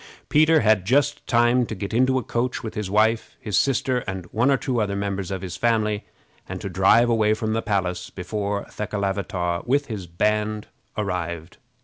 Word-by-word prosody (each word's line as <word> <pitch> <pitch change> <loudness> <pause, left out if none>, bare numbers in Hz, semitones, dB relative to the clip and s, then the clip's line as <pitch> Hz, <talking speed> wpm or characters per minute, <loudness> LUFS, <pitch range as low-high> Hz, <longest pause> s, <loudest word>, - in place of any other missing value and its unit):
Peter 155 +1 +5
had 110 -3 +3
just 130 +7 +1
time 120 +1 +3
to 110 - -4
get 100 +2 -5
into 130 +3 +3
a 130 - -1
coach, 120 +3 -2
with 110 - -5
his 105 -3 -4
wife, 110 +3 +1
his 105 -3 -3
sister, 130 +1 +2
and 95 -2 -4
one 120 +5 +2
or 135 - +4
two 125 -3 -1
other 100 -1 -1
members 100 -2 -3
of 95 -1 -4
his 90 -1 -5
family, 110 -3 +1 0.4
and - - -5
to - - -5
drive 120 +2 +4
away 110 -2 +3
from 110 0 -2
the 115 - 0
palace 95 -5 -2
before 100 +2 -3
Thekelavitaw, 100 -4 -2
with 140 +3 +2
his 105 -7 -6
band, 105 +4 0 0.3
arrived. 85 -5 -3
105 Hz, 180 wpm, -23 LUFS, 95-120 Hz, 0.4 s, Peter